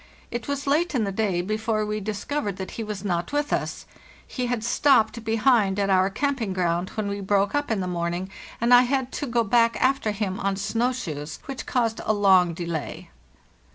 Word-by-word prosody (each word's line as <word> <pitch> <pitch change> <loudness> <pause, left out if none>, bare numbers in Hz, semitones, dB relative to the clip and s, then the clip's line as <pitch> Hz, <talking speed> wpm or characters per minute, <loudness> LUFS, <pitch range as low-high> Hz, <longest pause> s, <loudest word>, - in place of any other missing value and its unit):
It 240 0 -4
was 280 0 -3
late 305 +3 +1
in 235 - +2
the 200 - -1
day 195 -3 0
before 215 +2 -1
we 210 0 -2
discovered 210 +1 -3
that 190 -1 -6
he 230 - -5
was 210 -2 -6
not 175 -3 -1
with 290 +1 0
us; - - -2 0.4
he 250 -1 -3
had 240 -3 -2
stopped 235 -2 +3
behind 225 -3 +2
at 200 -1 +1
our 190 0 +4
camp 280 +5 -1
ing 200 -4 -2
ground 175 0 0
when 215 -2 -2
we 200 0 -3
broke 195 0 +1
up 290 0 0
in 220 -4 0
the 185 - -2
morning, 175 +1 -3 0.3
and 235 +2 +3
I 245 - +9
had 260 0 0
to 290 - -4
go 235 -1 +1
back 230 +1 +3
after 260 -4 +2
him 200 -2 -2
on 195 0 0
snow 225 +5 0
shoes, 155 - -5
which 275 -2 -6
caused 230 -3 0
a 215 - +1
long 190 -4 +4
delay. 170 -3 -5
215 Hz, 205 wpm, -25 LUFS, 190-245 Hz, 0.4 s, I